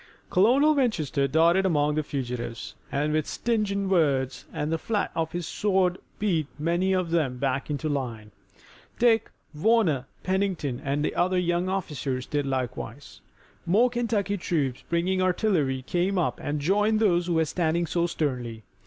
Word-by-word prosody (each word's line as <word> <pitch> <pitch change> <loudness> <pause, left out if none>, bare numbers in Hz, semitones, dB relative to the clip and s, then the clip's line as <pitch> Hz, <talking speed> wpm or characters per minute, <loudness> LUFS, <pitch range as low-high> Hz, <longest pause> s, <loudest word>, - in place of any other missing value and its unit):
Colonel 260 +11 +5
Winchester 160 - +1
darted 165 +6 +4
among 150 -5 +2
the 155 - +1
fugitives 125 -5 -5 0.2
and 150 +2 0
with 155 -1 0
stinging 205 -4 -1
words 140 -8 +1
and 150 +2 -3
the 165 - 0
flat 215 +2 -1
of 160 -1 -2
his 175 -1 -3
sword 190 -1 +1 0.2
beat 170 -8 0
many 170 +5 +1
of 185 -3 0
them 150 -7 +1
back 135 +2 -1
into 150 +1 -2
line. 120 -7 -3 0.7
Dick, 225 -2 +3 0.2
Warner, 160 - +2 0.2
Pennington 185 -9 -1
and 145 +2 0
other 185 +1 +1
young 175 +1 +1
officers 145 -9 -3
did 145 -1 -2
likewise. 130 -3 -4 0.5
More 225 +8 +4
Kentucky 215 -5 0
troops 145 -8 -1
bringing 180 +3 +1
artillery 175 - +1
came 180 +7 0
up 175 - 0
and 145 +1 -2
joined 210 +7 +2
those 175 -5 +2
who 175 - 0
were 160 0 +3
standing 170 +1 0
so 170 +1 0
sternly. 125 -9 -3
170 Hz, 150 wpm, -26 LUFS, 140-190 Hz, 0.7 s, Colonel